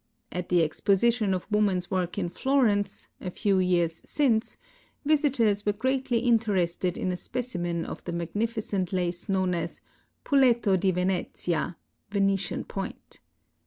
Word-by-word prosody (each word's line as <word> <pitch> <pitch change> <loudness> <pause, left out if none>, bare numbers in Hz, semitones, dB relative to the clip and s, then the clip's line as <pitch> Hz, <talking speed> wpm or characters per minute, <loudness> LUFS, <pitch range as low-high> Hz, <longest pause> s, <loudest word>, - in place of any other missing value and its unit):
At 180 0 -4
the 175 -2 +4
exposition 205 +6 +2
of 185 -1 -1
woman's 195 -4 +1
work 180 -1 -1
in 185 -3 0
Florence, 225 -3 +1
a 185 - -3
few 195 +1 +1
years 175 -3 +1
since, 240 -5 +1 0.5
visitors 270 -9 +2
were 205 - +1
greatly 260 +1 0
interested 195 -7 +1
in 185 - -1
a - - -1
specimen 175 -7 -3
of - - -7
the 175 - -3
magnificent 200 +2 -2
lace 180 +1 -2
known 190 -2 +1
as 170 -1 -4 0.2
" - - -45
Puleto 240 -7 +4
di 190 +1 +2
Venezia" 180 -2 -1 0.3
(Venetian 195 -2 0
Point). 195 -1 -7
195 Hz, 135 wpm, -27 LUFS, 180-230 Hz, 0.5 s, the